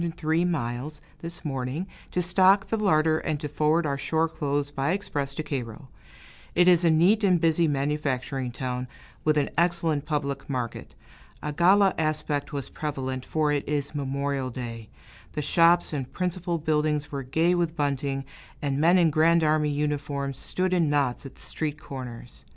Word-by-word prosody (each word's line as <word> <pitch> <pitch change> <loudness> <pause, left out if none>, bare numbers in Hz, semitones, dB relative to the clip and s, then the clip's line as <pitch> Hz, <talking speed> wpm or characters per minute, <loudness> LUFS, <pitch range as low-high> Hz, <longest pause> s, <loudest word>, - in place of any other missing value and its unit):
(603 165 0 0
miles), 145 -2 -2 0.2
this 170 0 -7
morning, 135 +4 -2 0.2
to 180 - -1
stock 190 +2 +4
the - - +1
larder 160 -7 +3
and 150 -2 -2
to 150 - -4
forward 155 +3 +1
our 140 -1 -1
shore 160 +3 +1
clothes 145 -2 -2
by 140 +4 0
express 145 -8 -2
to 155 - -3
Cairo. 130 -3 -5 0.7
It 175 - +5
is 175 -1 +6
a 170 - +5
neat 180 +7 +4
and 185 -3 +4
busy 165 0 +3
manufacturing 135 -3 -1
town, 125 0 -4 0.4
with 155 -1 +2
an 145 - +1
excellent 165 -4 +1
public 140 -3 -2
market. 125 -4 -4 0.5
A 150 - -3
gala 190 +4 +5
aspect 155 -2 -1
was 140 -2 -4
prevalent, 130 -4 -4
for 155 -2 +1
it 145 -1 0
is 145 -1 -1
Memorial 140 -1 -2
Day; 115 -3 -7 0.4
the 150 - -2
shops 170 +2 +4
and 135 -4 -4
principal 180 -1 -2
buildings 150 -1 0
were 140 -1 -3
gay 160 +7 +2
with 170 -2 0
bunting, 140 -2 -1 0.3
and 140 -1 -1
men 170 +3 +5
in 170 -3 +4
Grand 165 +2 +4
Army 155 -1 +2
uniforms 145 -2 -2
stood 185 0 -1
in 170 -4 +2
knots 140 -2 0
at 135 - -14
the - - -19
street 150 -2 -4
corners. 125 -3 -8
150 Hz, 170 wpm, -26 LUFS, 140-165 Hz, 0.7 s, is